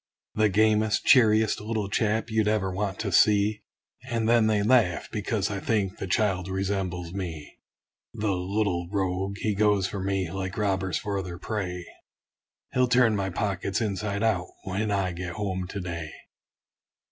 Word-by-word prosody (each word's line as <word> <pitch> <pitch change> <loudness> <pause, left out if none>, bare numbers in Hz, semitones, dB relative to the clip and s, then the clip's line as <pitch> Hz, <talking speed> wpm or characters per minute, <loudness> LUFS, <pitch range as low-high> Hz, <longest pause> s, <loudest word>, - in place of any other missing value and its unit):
The 110 0 +3
gamest, 110 +1 +2
cheeriest 110 -4 +5
little 110 -1 -2
chap, 110 +3 0
you'd 110 -1 +2
ever 105 -3 +1
want 100 0 -2
to 100 -3 -2
see! 105 +3 +4 0.5
And 115 -2 0
then 115 -1 +4
they 105 -2 +2
laugh, 110 -6 +3
because 105 0 -1
I 100 - -3
think 100 -3 -1
the - - -4
child 90 -1 +1
resembles 95 -3 -2
me. 85 -6 -6 0.6
The 105 -1 0
little 90 -1 -1
rogue! 95 0 -1
he 105 0 -1
goes 105 -1 +2
for 95 0 -4
me, 95 -3 -1
like 95 0 -4
robbers 95 -4 0
for 100 -1 -2
their 90 -2 -7
prey; 90 -3 -4 0.9
He'll 130 0 +3
turn 125 -3 +4
my 95 -1 -1
pockets 95 0 -2
inside 100 -1 -2
out, 100 -5 +1 0.2
when 100 +3 -2
I 100 -3 0
get 90 0 -5
home 95 -3 -3
to 100 - -5
day. 85 -3 -5
100 Hz, 160 wpm, -26 LUFS, 95-110 Hz, 0.9 s, cheeriest